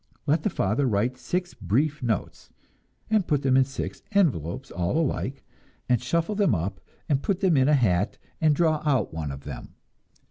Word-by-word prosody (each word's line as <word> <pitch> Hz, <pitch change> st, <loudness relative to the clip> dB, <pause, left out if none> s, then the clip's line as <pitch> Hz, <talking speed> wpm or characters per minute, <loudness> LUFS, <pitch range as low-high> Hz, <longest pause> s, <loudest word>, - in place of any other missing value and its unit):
Let 150 Hz, +2 st, +2 dB
the 210 Hz, -, 0 dB
father 125 Hz, -, 0 dB
write 115 Hz, +3 st, +1 dB
six 180 Hz, +5 st, -3 dB
brief 145 Hz, +7 st, 0 dB
notes, 115 Hz, -5 st, -3 dB, 0.6 s
and 215 Hz, -5 st, +3 dB
put 145 Hz, -2 st, +1 dB
them 130 Hz, -1 st, +3 dB
in 130 Hz, 0 st, +5 dB
six 135 Hz, 0 st, -5 dB
envelopes 125 Hz, -, +1 dB
all 85 Hz, -, -1 dB
alike, 140 Hz, -3 st, -1 dB, 0.4 s
and 125 Hz, -3 st, +2 dB
shuffle 165 Hz, +10 st, 0 dB
them 200 Hz, -, +2 dB
up 95 Hz, +3 st, -3 dB, 0.3 s
and 140 Hz, -3 st, +1 dB
put 195 Hz, +2 st, 0 dB
them 185 Hz, -5 st, +4 dB
in 135 Hz, +1 st, +4 dB
a 150 Hz, -, +5 dB
hat 100 Hz, -7 st, +1 dB, 0.2 s
and 155 Hz, -2 st, +4 dB
draw 155 Hz, -1 st, +2 dB
out 130 Hz, -, +1 dB
one 80 Hz, -2 st, -3 dB
of 70 Hz, 0 st, -8 dB
them. -, -, -8 dB
135 Hz, 180 wpm, -26 LUFS, 105-160 Hz, 0.6 s, in